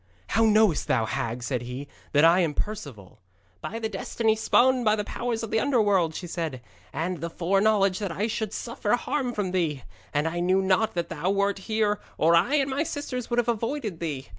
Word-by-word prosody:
'How 225 +2 +3
knowest 215 -6 +3
thou, 115 - +2
hag,' 120 +2 -3
said 125 -1 -2
he, 125 +3 -6 0.2
'that 145 +2 +5
I 170 +2 +6
am 160 -5 +1
Perceval?' 130 - -6 0.4
'By 225 - -5
the 225 -1 -2
destiny 220 +2 0
spun 250 +3 +3
by 215 -1 +4
the 210 - -2
powers 235 +1 -3
of 225 - -5
the 220 - +2
Underworld,' 205 - +2
she 180 - -5
said, 165 -6 -4 0.3
'and 175 +2 -3
the 170 - -3
foreknowledge 195 +3 +2
that 200 -4 -3
I 200 +5 -1
should 220 -2 -2
suffer 230 -3 -2
harm 250 +1 -2
from 205 -5 -2
thee. 160 -8 -1 0.3
And 145 +2 0
I 170 +1 -2
knew 185 +2 +2
not 190 +3 +2
that 170 -1 -2
thou 165 +5 -2
wert 200 0 +1
here, 215 -1 +1 0.2
or 165 +2 +4
I 185 - +3
and 275 -2 +1
my 275 +2 0
sisters 285 -5 -4
would 240 - -1
have 240 -1 +2
avoided 230 - -2
thee. 145 - -4
200 Hz, 205 wpm, -26 LUFS, 165-225 Hz, 0.4 s, I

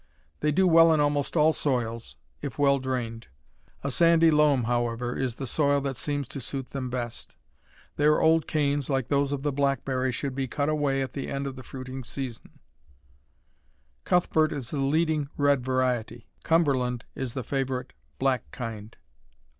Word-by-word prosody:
They 150 - +1
do 190 +6 +3
well 165 -1 +7
in 155 - +3
almost 145 +2 +1
all 155 +1 +5
soils, 115 -6 -2 0.3
if 140 -6 -5
well 140 -1 +4
drained. 120 -3 -4 0.6
A 140 - -2
sandy 165 +2 +5
loam, 150 -4 +4
however, 120 +1 -1
is 130 -3 -2
the 135 - -5
soil 140 +2 +2
that 135 -1 -3
seems 145 0 -2
to 140 - -6
suit 135 +1 -5
them 130 -2 -4
best. 120 -2 -5 0.6
Their 150 +1 +4
old 160 0 +3
canes, 145 -2 0
like 135 -3 0
those 140 -1 +1
of 140 -1 -3
the 145 - +1
blackberry, 135 -2 0
should 135 +2 -3
be 135 0 -2
cut 145 +3 -1
away 145 -3 +1
at 130 - -6
the 140 - -4
end 140 0 -3
of 135 -1 -5
the 130 - -9
fruiting 130 +1 -7
season. 125 -1 -7 1.5
Cuthbert 160 -3 +2
is 135 -5 -5
the 145 - -2
leading 150 +1 +1
red 145 -3 +3
variety. 125 -2 -1 0.2
Cumberland 130 -8 +1
is 130 -3 -5
the 130 - -3
favorite 130 0 -3 0.2
black 130 -3 0
kind. 115 -3 -7
135 Hz, 165 wpm, -27 LUFS, 125-145 Hz, 1.5 s, well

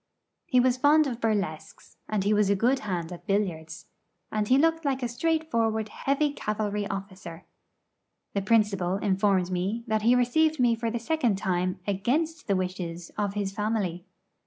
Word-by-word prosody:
He 255 - +3
was 250 0 +3
fond 300 +3 +5
of 245 -4 -4
burlesques, 200 -8 -3
and 210 -3 0
he 205 +2 +2
was 210 -1 +3
a 200 - +4
good 245 +7 +2
hand 180 -5 -4
at 175 +4 -10
billiards; 175 -5 -2 0.5
and 210 -1 -1
he 255 - +5
looked 325 +2 +2
like 270 -3 -1
a - - +1
straightforward 235 -6 0
heavy 280 +5 0
cavalry 210 -3 -2
officer. 190 -4 -7 0.9
The 200 - 0
principal 195 -4 +2
informed 195 -2 +1
me 190 +6 -2
that 220 -2 0
he 235 +3 +4
received 305 +5 +2
me 240 -2 +4
for 230 0 -2
the 235 - -2
second 240 -4 0
time 185 -2 -1
against 270 - -1
the 200 - +2
wishes 180 -2 -4
of 205 -1 -2
his 200 -2 -2
family. 200 -4 -2
210 Hz, 165 wpm, -27 LUFS, 190-245 Hz, 0.9 s, fond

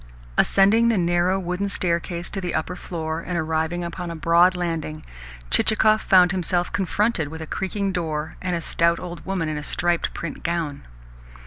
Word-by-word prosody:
Ascending 220 +4 +4
the 225 - +2
narrow 175 +1 +2
wooden 180 +2 -2
staircase 170 -2 -2
to 195 - -3
the 180 -1 -3
upper 160 +3 -2
floor, 160 -3 -4
and 175 +1 -4
arriving 160 +2 -1
upon 175 0 -5
a 170 - -5
broad 170 +3 +4
landing, 165 -3 -3 0.5
Chichikov 215 - +4
found 180 -2 +5
himself 175 -1 0
confronted 200 -2 0
with 160 +2 -8
a 160 - -5
creaking 195 +4 -2
door 160 -4 -3
and 180 -1 -1
a 170 - -2
stout 170 +1 +1
old 175 -1 -7
woman 185 -4 -1
in 155 -1 -2
a - - -7
striped 175 +2 0
print 165 - -5
gown. 165 - -3
175 Hz, 175 wpm, -23 LUFS, 165-185 Hz, 0.5 s, found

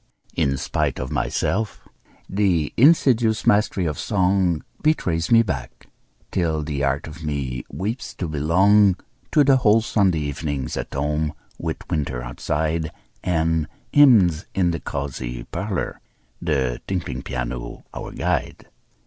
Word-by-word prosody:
In 70 -4 +1
spite - - -1
of 65 - -4
myself, 110 +2 -1 0.4
the 95 -7 +1
insidious 120 -6 +4
mastry 105 -3 +3
of 75 -4 -2
song 90 -4 +1 0.2
Betrays 90 - +1
me 115 -1 +6
back, 65 - -5 0.5
till 80 -4 0
the 75 -2 -3
heart 70 +1 0
of 80 +1 -10
me 70 -5 -3
weeps 110 +7 -4
to 90 - -3
belong 95 +6 +4 0.4
To 150 - +5
the 135 -1 +5
old 110 0 +5
Sunday 95 -8 +2
evenings 75 -2 -3
at - - -4
home, 75 +2 -1 0.3
with - - -4
winter 65 -5 -2
outside 80 +5 -2 0.3
And 80 -3 +1 0.3
hymns 100 - +6
in 90 -3 +2
the 85 - -3
cozy 65 -4 -4
parlor, 100 - -4 0.4
the 65 -7 0
tinkling 85 -9 -3
piano - - -5
our - - -6
guide. - - -2
80 Hz, 130 wpm, -23 LUFS, 70-100 Hz, 0.5 s, me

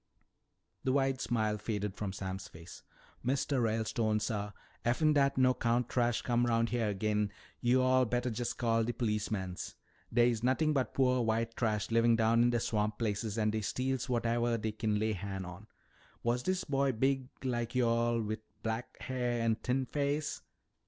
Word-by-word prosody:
The 130 - +1
wide 135 -1 +1
smile 110 -3 0
faded 105 -2 -2
from 100 -1 -4
Sam's 95 0 -5
face. 85 +2 -12 0.4
"Mistuh 130 +1 +1
Ralestone, 110 -1 +1
suh, 105 -2 -2 0.3
effen 150 +6 +3
dat 140 -2 +3
no 130 -1 +5
'count 120 0 0
trash 120 -1 +1
comes 120 0 +2
'round 115 0 +2
heah 115 -3 0
agin, 105 +1 0 0.3
yo'all 130 +1 +4
bettah 125 +1 -1
jest 120 +1 -3
call 115 -1 +2
de 120 +2 -1
policemans. 105 -5 -2 0.4
Dey's 120 -2 +3
nothin' 135 +5 +2
but 135 -3 -1
poah 130 -2 +3
white 115 0 0
trash 110 -3 -1
livin' 115 0 +4
down 115 +1 +3
in 120 - +5
de 120 -1 +1
swamp 105 -1 -1
places 110 -1 -2
an' 110 -1 +2
dey 110 0 -1
steals 125 +5 -1
whatevah 120 -1 +1
dey 110 +1 -2
kin 105 0 -1
lay 110 +1 +1
han' 95 -1 -5
on. 90 +5 -10 0.6
Was 120 +1 +1
dis 185 +7 0
boy 140 -2 +1
big 130 +2 0
like 120 -2 -2
yo'all, 120 -1 +2
wi' 110 +1 -2 0.3
black 110 +2 -4
hair 125 -2 -1
an' 115 - +3
a - - +2
thin 130 +1 +1
face?" 145 +2 -1
115 Hz, 170 wpm, -32 LUFS, 110-125 Hz, 0.6 s, no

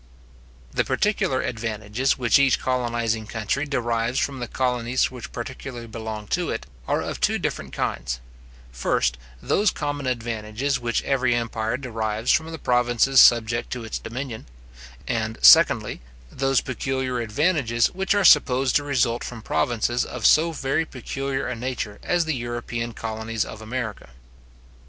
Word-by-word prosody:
The - - +1
particular 190 -1 0
advantages 110 +2 -1
which 125 +1 +4
each 135 -2 +4
colonizing 120 -3 -1
country 110 +7 -2
derives 120 -2 -1
from 140 -1 -1
the 120 - -4
colonies 125 -1 0
which 125 -2 -8
particularly 120 0 -7
belong 110 -2 -6
to 175 -1 0
it, 115 - -3 0.2
are - - 0
of - - -5
two - - +2
different - - -3
kinds; - - -2 0.5
first, 60 +1 0 0.2
those 205 0 +3
common 145 -4 -3
advantages 120 +2 -2
which 120 -1 -1
every 130 -3 +1
empire 115 0 -2
derives 115 -3 -1
from 160 +1 +2
the 160 - -5
provinces 125 0 +4
subject 120 0 +4
to 120 -2 -5
its 110 - -4
dominion; 115 - -6 0.6
and, 110 -1 -2
secondly, - - +6 0.3
those 135 -1 +1
peculiar 130 -1 -2
advantages 120 0 +1
which 190 +2 0
are 200 -2 +2
supposed 130 -4 +5
to 145 - -3
result 120 -4 +1
from 115 -2 -7
provinces 120 +2 0
of - - -5
so 165 +2 +5
very 140 0 0
peculiar 135 -1 -4
a 125 - -3
nature 115 -3 -4
as 175 -1 +1
the 160 - 0
European 120 -1 -4
colonies 110 0 -3
of 110 - -9
America. 110 - -5
120 Hz, 145 wpm, -24 LUFS, 115-135 Hz, 0.6 s, secondly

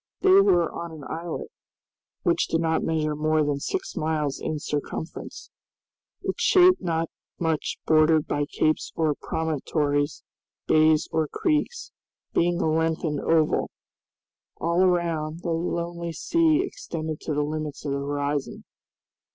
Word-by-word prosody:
They 380 - +5
were 175 - +4
on 170 0 -6
an 155 -3 -10
islet, 170 - -5 0.7
which 170 -3 +2
did 165 - 0
not 160 -1 +1
measure 155 -2 0
more 155 +1 +2
than 145 -1 -1
six 380 - -3
miles 150 -3 -1
in 155 - -2
circumference, 150 +2 -5 0.7
its - - -3
shape 365 -1 +6
not 165 -2 -1 0.3
much 160 -3 -1
bordered 155 0 +4
by 145 0 -1
capes 155 0 0
or 155 -2 +2
promontories, 145 -1 -1 0.4
bays 155 0 +4
or 160 -1 +1
creeks, 315 - -1 0.4
being 175 0 +2
a - - +1
lengthened 160 -1 0
oval. 160 -2 +2 0.9
All 170 +2 +1
around, 170 -3 +1
the 170 - -1
lonely 170 0 -2
sea 325 - +2
extended 160 - -5
to 155 - -3
the 150 - +1
limits 155 -1 -4
of 140 - -1
the 140 - -1
horizon. 145 0 -2
160 Hz, 135 wpm, -25 LUFS, 150-170 Hz, 0.9 s, shape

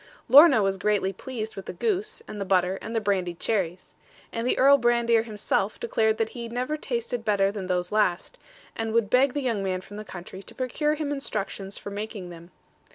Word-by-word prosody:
Lorna 275 -3 +8
was 195 0 0
greatly 200 -1 +1
pleased 220 +1 -6
with 195 - -8
the - - -5
goose, 430 +1 -2
and 205 - -7
the - - +1
butter, 185 0 +1
and 225 - -6
the - - +3
brandied 185 -5 -1
cherries; 185 -5 -2 0.4
and 230 +1 -2
the - - +1
Earl 280 +1 +6
Brandir 235 -2 +3
himself 210 -1 -1
declared 220 -2 +1
that 225 -1 0
he 235 -2 -7
never 250 +5 -2
tasted 240 -4 -3
better 200 -2 +2
than 200 -3 -5
those 180 -1 -1
last, 210 - 0 0.4
and 225 -1 -3
would 230 -3 +1
beg 255 +1 +4
the 290 - -1
young 230 -6 0
man 185 -1 -1
from 205 +2 -11
the 215 - -6
country 185 -1 -9
to - - -12
procure 295 +4 0
him 300 -2 -3
instructions 205 -7 -4
for 200 - -8
making 205 -3 -6
them. 170 0 -12
220 Hz, 205 wpm, -26 LUFS, 195-245 Hz, 0.4 s, Lorna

